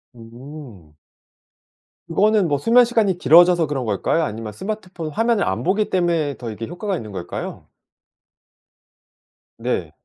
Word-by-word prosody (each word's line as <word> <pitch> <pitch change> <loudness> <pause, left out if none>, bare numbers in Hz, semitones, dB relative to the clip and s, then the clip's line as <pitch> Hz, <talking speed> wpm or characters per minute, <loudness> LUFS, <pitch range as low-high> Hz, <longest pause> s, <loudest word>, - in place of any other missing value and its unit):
음. 115 - -12 1.1
그거는 205 +3 +2
뭐 145 -2 +1
수면 235 - +5
시간이 220 -6 +1
길어져서 175 -1 +5
그런 140 -3 -3
걸까요? 110 +10 0
아니면 110 -5 -5
스마트폰 185 - -6
화면을 225 +5 +1
안 105 +5 -2
보기 205 +6 +1
때문에 170 -6 0
더 120 - -6
이게 110 +2 -6
효과가 190 +4 -3
있는 110 -10 -7
걸까요? 90 -3 -7 1.9
네. 115 -9 -2
160 Hz, 280 characters per minute, -21 LUFS, 115-190 Hz, 1.9 s, 수면